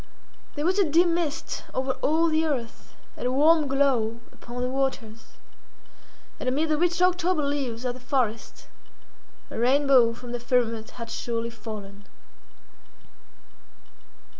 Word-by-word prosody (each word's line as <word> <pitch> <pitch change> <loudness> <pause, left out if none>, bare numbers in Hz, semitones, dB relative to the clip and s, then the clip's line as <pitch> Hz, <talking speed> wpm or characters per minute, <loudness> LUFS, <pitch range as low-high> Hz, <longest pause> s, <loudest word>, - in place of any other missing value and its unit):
There 295 +1 -2
was 370 +3 +2
a - - +6
dim 340 +3 +4
mist 325 -2 -2
over 260 +1 0
all 320 +3 +3
the 315 0 +2
earth, 255 -8 -4 0.2
and - - -3
a - - 0
warm 305 +3 +4
glow 260 -5 +1
upon 245 +1 -7
the - - 0
waters, 255 -4 -3 1.1
and 255 - -1
amid 305 +5 0
the 305 - +2
rich 350 +1 +2
October 360 -3 +2
leaves 265 -4 -2
of 250 - 0
the 255 - -11
forest, 250 -4 -2 0.8
a - - -5
rainbow 260 -1 +4
from 240 0 -9
the 245 - -3
firmament 235 -2 0
had 230 -1 -6
surely 235 0 -3
fallen. 205 -3 -9
260 Hz, 140 wpm, -26 LUFS, 235-310 Hz, 1.1 s, a